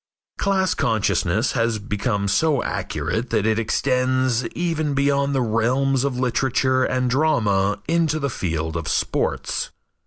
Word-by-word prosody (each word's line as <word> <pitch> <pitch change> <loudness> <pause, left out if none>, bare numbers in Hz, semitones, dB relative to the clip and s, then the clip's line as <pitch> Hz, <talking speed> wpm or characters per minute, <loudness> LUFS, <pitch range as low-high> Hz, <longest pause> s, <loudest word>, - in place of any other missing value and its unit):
Class 190 -2 +1
consciousness 110 0 +1
has 115 -2 0
become 105 0 -2
so 145 +7 +2
acute 90 - -3
that 110 -2 0
it 110 0 +2
extends 130 +1 +1
even 160 -4 -1
beyond 140 0 +1
the 130 - +2
realms 125 +4 +1
of 140 -3 -1
literature 130 +1 +1
and 130 0 0
drama 110 -8 +2
into 165 -2 +1
the 140 -3 -2
field 80 -5 -3
of 80 0 -3
sports. - - -1
125 Hz, 130 wpm, -22 LUFS, 110-140 Hz, -, so